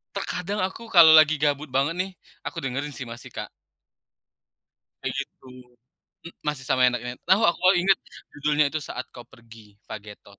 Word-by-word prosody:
Terkadang 185 +2 -3
aku 225 +5 -5
kalau 170 -6 +8
lagi 155 0 +6
gabut 150 0 0
banget 140 +5 0
nih, 190 +1 -2 0.3
aku 165 -3 -5
dengerin 140 +3 -3
sih 125 0 -7
masih, 120 +2 -10
Kak. - - -6 1.6
Kayak - - -3
gitu. 130 - -22 0.8
M - - -8
masih 150 -4 -3
sama 130 -1 +2
enaknya 125 0 -4
tahu, 195 +4 +5
aku 170 - 0 0.2
inget 190 +2 +4 0.4
judulnya 150 0 +1
itu, 155 - -3
"Saat 130 - -6
Kau 120 - -9
Pergi", 115 -3 -18
Vagetoz. 105 -1 -11
145 Hz, 155 wpm, -25 LUFS, 125-165 Hz, 1.6 s, kalau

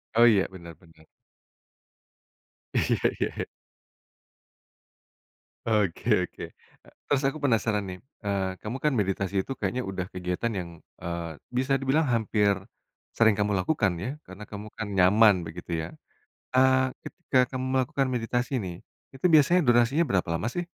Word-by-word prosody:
Oh 120 +1 +7
iya 100 -4 +3
bener 85 -3 -10
bener. 80 -2 -21 1.7
Iya - - +2 0.2
iya. - - -2 2.2
Oke 105 -2 +2
oke, - - -10 0.4
e - - -22 0.2
terus 145 0 +1
aku 135 +3 0
penasaran 110 -5 +1
nih, 90 0 -6 0.3
eee, 95 -2 -1
kamu 110 +4 -5
kan 150 - +3
meditasi 95 -1 -1
itu - - -5
kayaknya 125 +1 -1
udah 95 -1 -3
kegiatan 90 +6 -2
yang, 85 -1 -6 0.3
eee, 85 -2 -5 0.2
bisa 130 +1 +1
dibilang 135 +4 +2
hampir, 105 -3 +2 0.6
sering 110 -1 +5
kamu 105 0 +1
lakukan 100 -2 +1
ya 125 - -2 0.2
karena 95 +3 -10
kamu 105 0 -7
kan 110 - -4
nyaman 105 +3 +6
begitu 85 +2 -9
ya, 80 - -4 0.7
eee, 130 0 +5 0.2
ketika 130 - -1
kamu 130 -1 -3
melakukan 130 +1 +1
meditasi 120 +2 -1
nih, 90 -2 -5 0.4
itu 135 +5 -6
biasanya 155 +4 +6
durasinya 120 +6 +4
berapa 95 -7 0
lama 85 +7 -1
sih? 175 - -1
110 Hz, 140 wpm, -27 LUFS, 95-130 Hz, 2.2 s, Oh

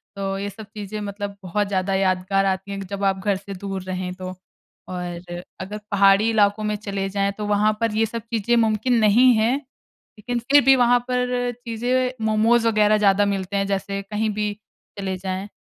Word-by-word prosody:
तो 195 0 -3
ये 200 +1 -3
सब 220 +2 -10
चीज़ें 210 0 -5
मतलब 200 0 -5
बहुत 205 +3 -1
ज़्यादा 195 -1 -1
यादगार 190 +1 +1
आती 190 +1 -1
हैं 200 - -4
कि 195 - -6
जब 200 0 -5
आप 195 -1 +1
घर 200 -2 +2
से 195 +1 -8
दूर 195 0 -5
रहें 185 -1 -4
तो। 185 0 -6 0.6
और 175 -1 -6 0.3
अगर 205 +3 -5
पहाड़ी 200 +2 +5
इलाकों 210 -1 +2
में 210 0 0
चले 200 -2 -3
जाएँ, 200 0 0
तो 210 - -3
वहाँ 210 +1 +3
पर 230 -1 +1
ये 225 +1 +3
सब 230 +1 -5
चीज़ें 230 +2 +1
मुमकिन 225 +1 +2
नहीं 230 +4 +6
हैं, 225 +4 +2 0.6
लेकिन 240 +3 -2
फिर 285 0 +8
भी 270 0 +7
वहाँ 245 -1 +4
पर 250 0 0
चीज़ें, 250 +3 0
मोमोज़ 225 +2 +3
वग़ैरह 215 -1 +4
ज़्यादा 205 -1 +3
मिलते 195 -1 -2
हैं, 195 0 0
जैसे 195 0 -2
कहीं 210 +2 -2
भी 210 0 -1 0.5
चले 190 -1 -3
जाएँ। 190 +1 -4
205 Hz, 190 wpm, -22 LUFS, 195-220 Hz, 0.6 s, फिर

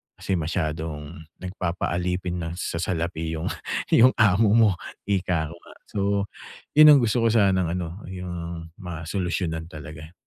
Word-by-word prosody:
kasi 95 -3 -2
masyadong 80 -1 -4 0.2
nagpapaalipin 90 0 -2
na 85 -1 -3
sa 85 -2 -3
salapi 80 -2 -2
yung, 80 +1 -2 0.4
yung 125 +3 +6
amo 105 +1 +4
mo, 115 -2 +6 0.4
ika 90 -5 0
ko - - -9
nga. - - -16 0.2
So, 105 - -3 0.7
yun 155 +1 +9
ang - - +5
gusto 115 +1 +2
ko - - +6
sanang 95 -5 +3
ano, 90 +1 -5
yung 85 -2 -6
masolusyonan 85 -2 -3
talaga. 80 -1 -10
85 Hz, 135 wpm, -25 LUFS, 80-95 Hz, 0.7 s, yun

